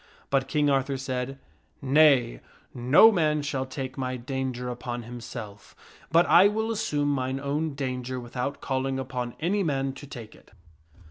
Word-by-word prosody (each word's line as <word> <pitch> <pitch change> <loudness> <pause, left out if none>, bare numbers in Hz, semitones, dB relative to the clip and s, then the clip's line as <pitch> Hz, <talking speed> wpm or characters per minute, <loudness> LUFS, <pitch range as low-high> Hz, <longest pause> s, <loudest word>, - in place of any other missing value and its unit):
But 135 -1 +2
King 150 -1 +1
Arthur 135 -1 +1
said, 130 0 -4 0.3
" 80 - -40 0.2
Nay; 135 - +5 0.3
no 130 - +6
man 155 -6 +1
shall 135 -2 -2
take 130 0 -6
my 130 -1 -2
danger 130 -1 -4
upon 120 0 -5
himself, 115 -3 -9 0.4
but 170 +2 +5
I 185 +3 +7
will 220 +2 -1
assume 145 -9 0
mine 130 -1 -1
own 145 +2 -2
danger 130 -2 -3
without 125 +3 -4
calling 135 0 -1
upon 125 -2 -4
any 190 +6 0
man 135 -5 -1
to 140 +1 -11
take 115 -5 -9
it." - - -20
135 Hz, 155 wpm, -26 LUFS, 125-145 Hz, 0.4 s, I